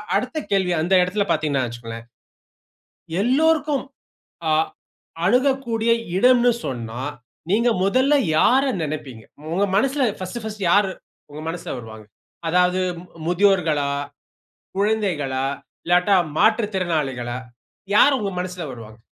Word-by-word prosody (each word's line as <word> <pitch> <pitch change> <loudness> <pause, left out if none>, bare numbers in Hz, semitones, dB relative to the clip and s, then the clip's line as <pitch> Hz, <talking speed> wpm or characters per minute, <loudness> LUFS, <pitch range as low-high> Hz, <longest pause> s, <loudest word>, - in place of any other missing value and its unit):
அடுத்த 255 +4 -1
கேள்வி, 190 -2 +2
அந்த 180 +4 0
இடத்தில 200 +3 0
பார்த்தீங்கன்னா 145 -4 +1
வச்சுக்கோங்களேன், 115 -1 -8 1.1
எல்லோருக்கும் 295 +4 +2 0.7
அ - - +3 0.7
அணுகக்கூடிய 240 0 +2 0.3
இடம்ன்னு 245 +2 +5
சொன்னா, 120 -2 -5 0.5
நீங்க 230 +4 +3
முதல்ல 260 +9 +3 0.2
யார 260 +10 +4 0.2
நினைப்பீங்க? 140 -7 -6 0.3
உங்க 195 +3 +2
மனசுல 270 +6 +2 0.2
பர்ஸ்ட் 190 +6 -5
பர்ஸ்ட் 215 -2 -5
யாரு 200 0 +4 0.4
உங்க 150 +1 -8
மனசுல 170 +1 -5
வருவாங்க? 110 -2 -10 0.4
அதாவது 180 +1 +3 0.5
முதியோர்களா? 175 -6 +2 0.9
குழந்தைகளா? 180 -11 0 0.4
இல்லாட்டா, 180 +3 +4 0.2
மாற்றுத்திறனாளிகளா? 160 - 0 0.6
யார் 275 +6 +6
உங்க 200 -2 -2
மனசுல 180 -1 -5
வருவாங்க? 110 -1 -11
185 Hz, 100 wpm, -22 LUFS, 145-230 Hz, 1.1 s, யார்